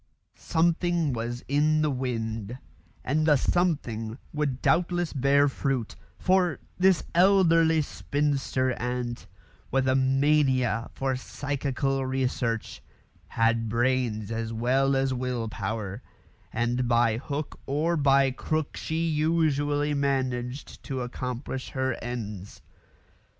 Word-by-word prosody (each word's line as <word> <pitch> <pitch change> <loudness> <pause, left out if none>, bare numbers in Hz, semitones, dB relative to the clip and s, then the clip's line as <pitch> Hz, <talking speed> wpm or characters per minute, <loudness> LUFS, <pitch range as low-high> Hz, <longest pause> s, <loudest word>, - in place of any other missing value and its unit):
Something 170 -2 +1
was 120 +1 -4
in 155 +2 +2
the 150 - +1
wind, 115 -3 -3 0.5
and 155 +3 +1
the 150 - +6
"something" 130 -9 0 0.2
would 145 -4 -1
doubtless 175 +1 +1
bear 140 +1 +4
fruit; 135 -4 -2 0.2
for 185 -2 +2 0.2
this 185 -2 +4
elderly 165 -3 +5
spinster 140 -3 -1
aunt, 125 -1 -3 0.4
with 130 0 +1
a 130 - +4
mania 130 -3 +2
for 135 -1 -1
psychical 135 0 -2
research, 130 -3 -2 0.5
had 115 0 +1
brains 115 -3 0
as 115 0 -3
well 130 +4 +2
as 135 0 +1
will 125 -2 -2
power, 105 0 -4 0.5
and 120 +2 0
by 120 -2 +3
hook 145 +3 -5
or 155 +5 +1
by 140 -3 +4
crook 155 +3 -2
she 165 +1 -2
usually 150 -2 +1
managed 130 -2 -2
to 130 -2 -3
accomplish 125 +1 -5
her 130 -1 -1
ends. 105 -5 -6
135 Hz, 110 wpm, -27 LUFS, 120-150 Hz, 0.5 s, the